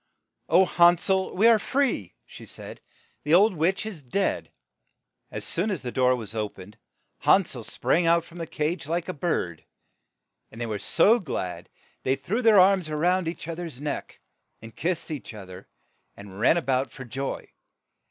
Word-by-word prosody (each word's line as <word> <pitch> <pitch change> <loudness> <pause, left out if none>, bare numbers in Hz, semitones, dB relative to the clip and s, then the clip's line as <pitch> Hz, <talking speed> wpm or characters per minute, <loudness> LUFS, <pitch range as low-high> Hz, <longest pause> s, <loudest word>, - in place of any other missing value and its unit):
"O, 180 +4 +6
Han 175 0 +5
sel! 190 +2 0
we 210 +5 +5
are 230 -2 +6
free, 230 - -1
' - - -52
' - - -50
she - - -13
said, - - -9 0.4
"the 150 +3 +4
old 200 +3 +5
witch 175 +6 0
is 200 -8 -7
dead." 165 +10 -1 0.8
As - - -4
soon 185 +6 -1
as 185 -9 -3
the 125 - -4
door 130 0 +3
was 110 -4 -6
o 105 -2 -2
pened, 95 +1 -13 0.5
Han 195 -1 +4
sel 120 -6 -6
sprang 130 - 0
out 170 0 +4
from 170 - -13
the 165 - -4
cage 155 +1 -3
like 170 +1 -2
a 185 - -3
bird, 90 - -2 0.9
and 115 - -12
they 120 - -2
were 110 -2 -3
so 205 - +4
glad 90 - -5
that - - -32 0.3
they 130 - +1
threw 220 - -2
their 225 -4 +6
arms 185 -3 +4
round 175 +4 +1
each 165 -1 -5
other's 165 -5 -6
neck, 145 0 -5 0.4
and 110 0 -12
kissed 170 -1 -2
each 140 -6 -6
other, 95 -2 -11 0.5
and 100 -1 -11
ran 160 - +4
a 170 - -1
bout 130 0 0
for 130 - -10
joy. 135 +3 -5
160 Hz, 190 wpm, -26 LUFS, 120-185 Hz, 0.9 s, O